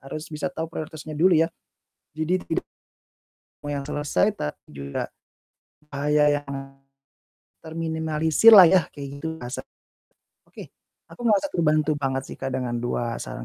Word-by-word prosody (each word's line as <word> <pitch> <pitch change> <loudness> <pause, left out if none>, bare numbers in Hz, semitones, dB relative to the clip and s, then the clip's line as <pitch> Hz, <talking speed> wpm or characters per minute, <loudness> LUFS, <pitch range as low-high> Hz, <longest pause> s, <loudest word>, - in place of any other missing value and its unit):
Harus 145 +3 -7
bisa 165 +5 -2
tau 165 -2 -4
prioritasnya 155 -1 -7
dulu 170 +3 +4
ya. 165 +1 +3 0.6
Jadi 160 +4 -1
tidak 165 - -2 1.0
mau 145 - -5
yang 140 -1 -3
selesai 145 -11 0
tapi 75 0 -5
juga 70 -1 -4 0.8
bahaya 145 +1 +2
yang 145 - -24 1.2
terminimalisir 160 +3 +3
lah 195 -3 +11
yah 180 -2 +4
kaya 140 -1 -8
gitu, 160 +1 -4
asap. 120 +2 -5 0.8
Oke, - - -11 0.4
aku - - -15
merasa 210 +5 +3
terbantu 155 -2 +2
banget 135 -2 -1
sih, - - -8
Kak, 135 - -3
dengan 125 -2 -2
2 120 -1 -2
saran - - -6
150 Hz, 140 wpm, -24 LUFS, 140-160 Hz, 1.2 s, lah